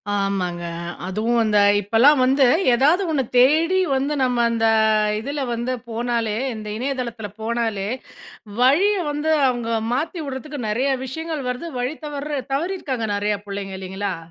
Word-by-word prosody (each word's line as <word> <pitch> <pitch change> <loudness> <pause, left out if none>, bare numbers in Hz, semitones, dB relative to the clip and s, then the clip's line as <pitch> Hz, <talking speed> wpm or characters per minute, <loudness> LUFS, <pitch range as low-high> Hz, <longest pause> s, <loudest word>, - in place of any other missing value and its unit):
ஆமாங்க. 190 -3 -1 0.4
அதுவும் 225 +5 0
அந்த 215 -1 +2 0.2
இப்பல்லாம் 230 +8 +4
வந்து 270 +1 +4 0.3
ஏதாவது 305 +10 +3
ஒண்ண 275 -4 +1
தேடி 320 +8 +4 0.2
வந்து 275 +3 0
நம்ம 250 -1 +1
அந்த 225 -1 +1 0.5
இதுல 280 +6 -4
வந்து 240 +2 -2 0.2
போனாலே 230 -2 -1 0.2
இந்த 215 -1 -7
இணையதளத்துல 240 -4 -4
போனாலே, 225 -3 -1 0.7
வழியை 365 +10 +4
வந்து 295 +2 -1 0.2
அவங்க 240 -2 -2 0.2
மாத்தி 325 +7 -2
வுடுறத்துக்கு 275 +1 -6
நெறைய 255 +6 +1
விஷயங்கள் 310 +1 -5
வருது. 250 +7 -4
வழி 255 +5 -2
தவர்ற 290 -1 -3
தவறியிருக்காங்க 275 -7 -2
நெறையா 205 0 -1
புள்ளைங்க 195 -1 -5
இல்லைங்களா? 190 0 -4
250 Hz, 130 wpm, -22 LUFS, 220-290 Hz, 0.7 s, இப்பல்லாம்